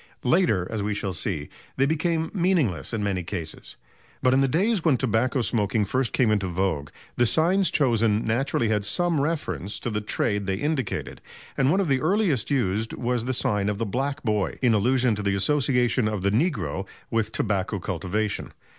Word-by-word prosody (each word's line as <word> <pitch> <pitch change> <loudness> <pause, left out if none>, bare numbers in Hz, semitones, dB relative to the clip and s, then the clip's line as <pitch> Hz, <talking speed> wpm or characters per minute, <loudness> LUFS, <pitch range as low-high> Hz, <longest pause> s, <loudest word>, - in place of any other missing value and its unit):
Later, 125 - +2
as 110 -2 -2
we 105 0 -1
shall 100 -2 -3
see, 80 -2 -3 0.3
they 135 - +3
became 160 +2 0
meaningless 170 - +1
in 110 -3 -2
many 95 -3 -1
cases. 85 -3 -6 0.5
But 130 - +4
in 135 - +4
the 135 - +3
days 190 - +1
when 150 -6 +3
tobacco 125 +1 +1
smoking 105 -2 +1
first 130 +1 0
came 120 -4 +2
into 100 -3 +1
vogue, 85 -5 -1 0.3
the 120 - +4
signs 175 - +2
chosen 115 - +2
naturally 115 0 0
had 105 -2 +1
some 170 - +1
reference 140 - -2
to 120 - -3
the 105 0 -1
trade 105 -1 -1
they 95 - 0
indicated, 135 0 -3 0.3
and 135 -1 +2
one 185 +6 +3
of 195 - +1
the 135 -2 +1
earliest 180 - +1
used 110 -5 0
was 120 -1 -1
the 130 - -1
sign 105 -4 0
of 105 - -2
the 115 - -1
"Black 135 +7 -2
Boy," 105 -4 0
in 120 -3 +4
allusion 125 +3 +2
to 105 - -3
the 100 -1 0
association 125 0 +2
of 105 -3 -2
the 100 - +2
negro 105 - -1 0.2
with 110 -1 0
tobacco 100 -1 -1
cultivation. 95 +4 -3
115 Hz, 185 wpm, -25 LUFS, 100-140 Hz, 0.5 s, But